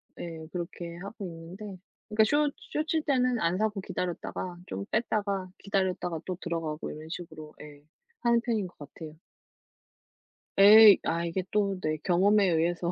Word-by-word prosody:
네, 165 -2 -7
그렇게 170 -1 -6
하고 200 +3 -7
있는데 180 +4 -8 0.3
그러니까 215 0 +4
숏 290 +4 +2 0.2
숏칠 315 +1 0
때는 255 -4 +1
안 170 0 +1
사고 210 -1 -1
기다렸다가 180 0 -4
좀 100 +1 -5
뺐다가 200 -4 -1
기다렸다가 185 -4 -1
또 185 -2 -4
들어가고 165 -3 -3
이런 155 +1 -9
식으로 160 -3 -8
예 145 -1 -12 0.4
하는 235 -1 +3
편인 225 -5 -1
것 180 - -19
같아요. 155 +2 -10 1.4
예. 210 +1 +10
아 170 +1 -1
이게 170 +2 -2
또 200 -2 +1
네 155 -2 -1
경험에 195 +3 +4
의해서 170 +1 +1
185 Hz, 305 characters per minute, -28 LUFS, 165-210 Hz, 1.4 s, 예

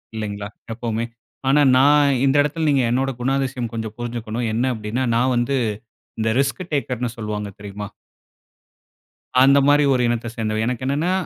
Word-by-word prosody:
இல்லைங்களா? 105 -2 -4 0.2
எப்பவுமே. 115 0 -2 0.4
ஆனா, 145 +2 +5 0.2
நான் 140 0 +5
இந்த 135 0 +3
எடத்தில, 155 +3 -1
நீங்க 140 -3 +3
என்னோட 135 +2 +1
குணாதிசயம் 130 -2 -1
கொஞ்சம் 110 -1 -5
புருஞ்சுக்கணும். 120 -1 -4
என்ன 125 +4 +1
அப்டினா, 110 +4 -2
நான் 125 +2 +2
வந்து, 120 +3 +1 0.6
இந்த 110 0 +1
ரிஸ்க் 135 +6 0
டேக்கர்னு 125 -4 -2
சொல்வாங்க. 105 -2 -4
தெரியுமா? 105 0 -7 1.5
அந்த 135 +1 +6
மாரி 145 +1 +5
ஒரு 125 - +1
இனத்த 120 0 -1
சேர்ந்தவன். 110 -1 -1
எனக்கு 125 0 -3
என்னன்னா 145 +7 0
120 Hz, 145 wpm, -21 LUFS, 110-135 Hz, 1.5 s, அந்த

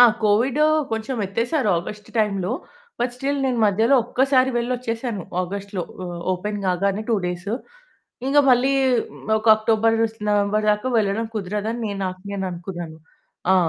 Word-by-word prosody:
ఆ! - - +11 0.2
Covid 240 +8 +3 0.3
కొంచెమెత్తేసారు 230 +3 -1
August 210 +4 -8
టైంలో, 195 -3 +1 0.5
but 245 0 0
still 280 +2 -1
నేను 250 -2 0
మధ్యలో 220 +6 +3
ఒక్కసారి 260 +1 +2
వెల్లోచ్చేసాను 240 -3 -2 0.2
ఆగస్ట్‌లో 195 0 -4 0.2
ఆహ్, 175 -1 -6
ఓపెన్ 205 +3 -3
కాగానే 195 +3 0
2 230 - +3
డేస్. 180 +2 -4 0.8
ఇంక 280 +2 +3
మళ్ళీ 255 +2 +4 0.7
ఒక 215 - -9
అక్టోబర్, 225 +1 +2 0.3
నవంబర్ 205 +1 +2
దాకా 210 +4 0
వెళ్ళడం 215 +2 0
కుదరదని 210 +3 -3
నే 205 - -2
నాకు 185 0 -4
నేననుకున్నాను. 175 -4 -5 0.5
ఆ! - - +6
210 Hz, 125 wpm, -22 LUFS, 195-240 Hz, 0.8 s, ఆ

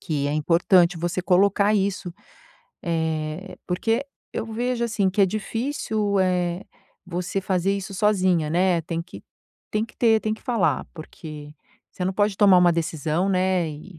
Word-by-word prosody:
que 145 -5 -2
é - - -1
importante 170 +3 +3
você 175 +2 -2
colocar 200 +3 +3
isso. 190 -3 -1 0.7
Eh, 160 +1 -3
porque 225 +9 0 0.3
eu - - -3
vejo, 240 +2 -2
assim, 205 -5 +1
que 195 - -1
é - - +5
difícil, 215 -1 -2
eh, 180 -1 0 0.4
você 180 +2 -3
fazer 190 0 0
isso 195 0 -6
sozinha, 185 -6 +2
né, 175 0 +2
tem 165 +1 -3
que 180 - -12 0.5
tem 215 +1 0
que 225 - -16
ter, 225 -2 +4
tem 215 - -1
que - - -17
falar, 235 -6 0
porque 155 -2 -10 0.4
você - - -6
não 190 - 0
pode 205 0 +1
tomar 195 -3 +6
uma 175 -1 +5
decisão, 165 +2 -1
né, 185 -3 +1
e 155 +3 -10
185 Hz, 160 wpm, -24 LUFS, 170-205 Hz, 0.7 s, tomar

